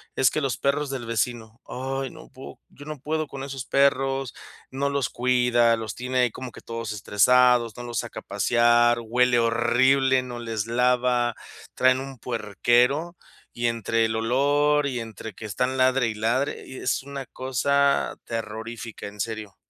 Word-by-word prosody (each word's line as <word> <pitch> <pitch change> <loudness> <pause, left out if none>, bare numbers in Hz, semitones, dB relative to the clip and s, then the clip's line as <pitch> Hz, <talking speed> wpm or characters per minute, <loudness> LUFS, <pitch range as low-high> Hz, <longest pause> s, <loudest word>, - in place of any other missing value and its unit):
es 130 - +4
que 155 - -2
los 135 -5 -1
perros 140 0 0
del 125 -4 -5
vecino, 115 +1 -3
ay, 135 0 -4
no - - -14
puedo, 130 - -12
yo 145 - -14
no 155 -2 -7
puedo 155 +2 -2
con 135 -1 -7
esos 135 -2 -6
perros, 135 -2 +1 0.3
no 140 +2 -1
los 140 -3 -1
cuida, 120 -2 +3
los 110 -2 -6
tiene 125 +1 -2
ahí 125 -1 +3
como 130 -1 -8
que - - -13
todos 115 -1 -5
estresados, 120 +3 +3
no - - -6
los 120 -1 -5
saca - - -5
a - - -12
pasear, 120 0 +3
huele 125 +1 +2
horrible, 125 +3 +3
no 125 -1 -7
les 115 -2 -4
lava, 125 0 +2 0.4
traen 130 0 +3
un 135 -2 -8
puerquero, 125 - +1 0.4
y 120 0 0
entre 115 0 0
el 110 0 -1
olor 145 +5 +2
y 125 -3 -3
entre 110 -1 -8
que 110 - -9
están 125 +6 -1
ladre 130 -1 +3
y 110 - -3
ladre, 120 +6 -1
y 130 - -10
es - - -1
una 140 -1 -7
cosa 140 +3 +1
terrorífica, 115 0 -6
en 105 0 -9
serio. 110 -1 -4
125 Hz, 170 wpm, -25 LUFS, 115-135 Hz, 0.4 s, es